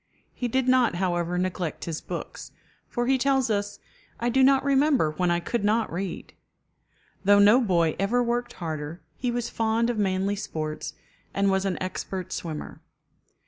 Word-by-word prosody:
He 245 - -2
did 260 +2 0
not, 255 -6 +4
however, 175 -1 0
neglect 180 -2 -2
his 165 -2 -4
books, - - -7 0.4
for 240 -1 -1
he 265 +1 +2
tells 265 -2 +2
us, 205 0 -1 0.4
"I 240 - 0
do 265 +2 +3
not 270 0 +5
remember 275 - +3
when 180 +3 0
I 175 0 +2
could 205 +5 -2
not 220 0 +1
read." 180 0 -5 0.9
Though 205 +1 +6
no 210 +5 +6
boy 170 -8 +2
ever 235 +6 +2
worked 240 0 -1
harder, 160 -1 -5
he 250 - -2
was 240 -1 -1
fond 225 +1 +1
of 225 - -3
manly 195 0 +1
sports, 155 -5 -4 0.4
and 200 0 +3
was 190 0 +1
an 190 -2 -1
expert 185 0 -4
swimmer. 160 -3 -6
200 Hz, 165 wpm, -26 LUFS, 180-240 Hz, 0.9 s, Though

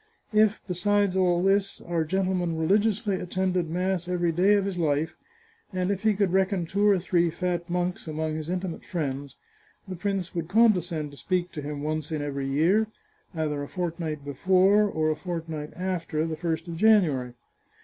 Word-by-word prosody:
If, 215 0 +4
besides 200 +1 +1
all 180 -2 +2
this, 195 +1 +1
our 170 -2 -1
gentleman 180 -1 0
religiously 200 +3 +1
attended 180 -1 -1
mass 180 +1 -1
every 175 -2 +1
day 185 +5 +4
of 200 -1 +1
his 190 -3 -3
life, 155 -1 0 0.6
and 185 0 -1
if 195 -1 -2
he 215 -1 +3
could 195 -3 +1
reckon 190 -2 +2
two 200 +5 +1
or 200 - +5
three 175 -1 +1
fat 175 +1 -2
monks 180 0 -2
among 155 0 -2
his 155 +1 -5
intimate 180 -1 -3
friends, 140 -5 -4 0.5
the 185 - -5
prince 190 0 -2
would 170 -2 -3
condescend 180 -7 +2
to 145 - -13
speak 180 +1 -1
to 155 - -6
him 145 0 -5
once 155 0 -3
in 155 -2 -2
every 140 -1 -3
year, 170 +11 +3 0.5
either 150 -2 -1
a 145 - -5
fortnight 165 -4 -4
before, 190 +8 +4
or 155 -3 0
a - - -1
fortnight 160 -4 -5
after, 170 -4 -2
the 160 -1 -3
first 165 0 -3
of 165 -1 -5
January. 160 - +3
175 Hz, 175 wpm, -26 LUFS, 160-190 Hz, 0.6 s, or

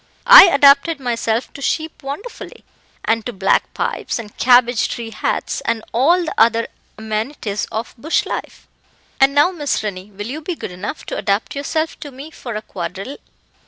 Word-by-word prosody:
I - - +11
adapted 280 0 +5
myself 235 -2 -2
to 280 - -10
sheep 315 +3 -2
wonderfully, 290 - -8 0.4
and 225 0 +1
to - - -3
black 195 -3 +1
pipes - - -2
and 215 -3 -9
cabbage 245 -2 +4
tree 230 -2 -6
hats, - - -2
and 225 -1 -1
all 335 +9 +3
the 315 - -4
other 230 +1 +3 0.3
amenities 215 0 -3
of 220 +2 -4
bush 315 +7 0
life; - - -6 0.5
and 270 +1 +4
now, 295 +6 +5
Miss 295 -9 -2
Rennie, 195 -1 -5
will 205 0 -8
you 280 +7 -5
be 340 +3 -4
good 195 - -7
enough 180 +3 -6
to - - -5
adapt 205 +8 -1
yourself 315 +3 -2
to 290 - -8
me 280 +4 -11
for 240 -6 -8
a 215 - -4
quadrille?" 190 +9 -6
245 Hz, 170 wpm, -19 LUFS, 220-295 Hz, 0.5 s, I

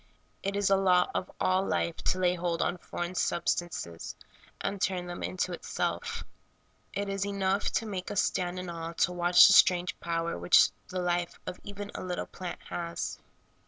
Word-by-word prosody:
It 195 +1 -2
is 200 -1 +1
a - - +7
law 185 -2 +3
of - - -2
all 185 +1 +2
life 170 -3 -1
to - - +2
lay 180 -1 +3
hold 170 -1 -1
on 175 0 -1
foreign 175 +2 -4
sub 175 -1 -1
stances 85 - -2 0.4
and 195 -1 -3
turn 180 -1 0
them 175 0 -6
into 185 0 -2
itself. 465 - -3 0.7
It 200 0 -2
is 195 0 -1
enough 200 0 0
to 225 - 0
make 195 -4 -4
us 205 - +2
stand 180 0 -1
in 180 0 -5
awe 165 -1 -5
to 170 +1 +2
watch 175 0 +7
the - - +7
strange 180 -1 +5
power 170 0 -2
which 180 - +6 0.2
the 185 - -4
life 175 -1 -1
of 180 - -6
even 205 0 -7
a - - -5
little 180 -1 -3
plant 180 -1 -7
has. 170 -1 -3
180 Hz, 185 wpm, -30 LUFS, 175-195 Hz, 0.7 s, a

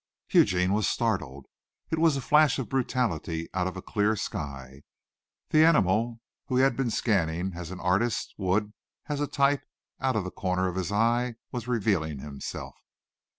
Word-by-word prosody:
Eugene 90 +1 +4
was 105 -1 +2
startled. 75 - -1 0.5
It 160 - 0
was 160 -3 +4
a - - -3
flash 150 +2 +4
of 130 - -4
brutality 110 - -1
out 95 -1 0
of 95 - -5
a 95 - -7
clear 105 0 +1
sky. 70 -7 -6 0.7
The 155 0 +5
animal, 115 - +3 0.3
whom 130 - 0
he 130 - +5
had 135 -2 +3
been 135 -2 0
scanning 95 -5 0
as 85 -1 -7
an 95 0 -7
artist 100 +6 0
would, 105 +2 0 0.4
as 145 -1 -1
a 145 - 0
type, 140 0 +2 0.4
out 130 -1 0
of 105 - +1
the 90 - -5
corner 95 +1 -1
of 90 - -3
his 95 0 -2
eye, 115 +3 +1 0.2
was 120 -2 -5
revealing 100 - 0
himself. 70 0 -7
105 Hz, 170 wpm, -27 LUFS, 90-125 Hz, 0.7 s, The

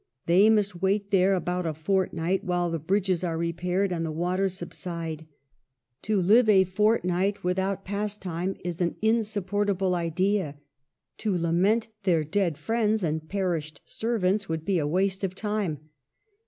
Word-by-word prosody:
They 190 +5 +5
must 205 -5 +1
wait 200 +1 0
there 195 0 +4
about 180 -1 -2
a 155 - -2
fortnight 185 +2 0
while 175 -1 0
the 165 - -2
bridges 185 +2 0
are 165 -2 -1
repaired 180 +3 -1
and 165 -1 -2
the 160 - -2
waters 180 +4 -1
subside. 165 -3 -6 0.7
To 215 -2 0
live 215 +6 +5
a 195 -3 +6
fortnight 195 0 +1
without 190 +2 -1
pas 205 +1 -3
time 180 0 -3
is 175 0 -3
an 175 - 0
insupportable 205 -3 +1
idea. 175 -1 0 0.6
To 205 -5 0
lament 185 +7 +1
their 175 -5 +2
dead 170 0 0
friends 220 +5 0
and 155 -1 -2
perished 170 -6 -2
servants 205 -4 -1
would 160 -1 -3
be 195 -3 +1
a 145 - 0
waste 190 +4 0
of 190 -1 -2
time. 205 -6 -2
185 Hz, 150 wpm, -26 LUFS, 170-200 Hz, 0.7 s, a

